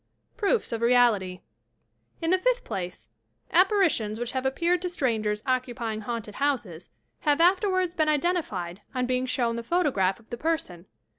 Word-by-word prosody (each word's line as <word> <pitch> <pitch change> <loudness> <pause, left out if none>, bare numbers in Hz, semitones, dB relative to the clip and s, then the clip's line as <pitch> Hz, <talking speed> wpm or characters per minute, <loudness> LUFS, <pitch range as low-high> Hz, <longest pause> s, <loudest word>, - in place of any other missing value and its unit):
PROOFS 440 +1 0
OF 230 -1 -3
REALITY 230 -7 +3 0.8
In 330 - +1
the 370 - +4
fifth - - +1
place, 180 -1 -5 0.4
apparitions 345 - +3
which 240 0 -3
have 260 0 -1
appeared 340 +7 +1
to 360 - -2
strangers 220 -9 -1
occupying 240 -4 -2
haunted 220 -1 -5
houses 240 - -2 0.3
have 295 -1 +2
afterwards 370 0 +3
been 310 -3 +1
identified 280 - -1
on 250 0 +1
being 255 +1 0
shown 235 -2 0
the - - -3
photograph 235 - +1
of 230 - -22
the 240 - -4
person. 235 - -3
255 Hz, 150 wpm, -26 LUFS, 220-340 Hz, 0.8 s, the